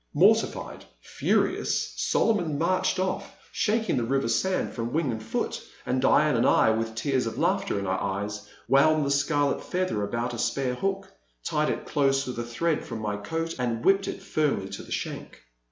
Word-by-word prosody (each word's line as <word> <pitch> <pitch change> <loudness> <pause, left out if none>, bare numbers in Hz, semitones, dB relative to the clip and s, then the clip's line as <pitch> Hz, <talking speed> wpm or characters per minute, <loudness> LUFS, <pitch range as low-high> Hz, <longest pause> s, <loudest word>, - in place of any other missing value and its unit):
Mortified, 210 +8 +2 0.2
furious, - - 0
Solomon 175 -10 +1
marched 185 +6 +1
off, 185 0 -2 0.2
shak 225 +1 0
ing - - +1
the 120 - +1
river 135 +2 0
sand 150 +12 0
from 115 0 -3
wing 155 -4 +1
and 110 -1 -4
foot, 110 - -3 0.2
and 130 +1 0
Diane 150 +1 +4
and 115 - +3
I, 110 - +5
with 110 0 -2
tears 130 +1 0
of 115 - -5
laughter - - +1
in 100 - -2
our 95 0 0
eyes, 100 +2 -3 0.2
wound 150 +2 +4
the 140 - 0
scarlet 145 0 +1
feather 180 - -1
about 115 +4 -2
a 120 - -5
spare 130 +1 0
hook, 195 +7 -3 0.3
tied - - 0
it - - -3
dose 135 -1 +2
with 125 -2 -5
a - - -1
thread 150 +8 -1
from 115 - -6
my 105 -2 -2
coat, 165 +11 -3
and 120 -2 -2
whipped 195 0 +4
it - - -5
firmly 140 -11 0
to - - -6
the - - -13
shank. - - -5
135 Hz, 185 wpm, -27 LUFS, 115-165 Hz, 0.3 s, I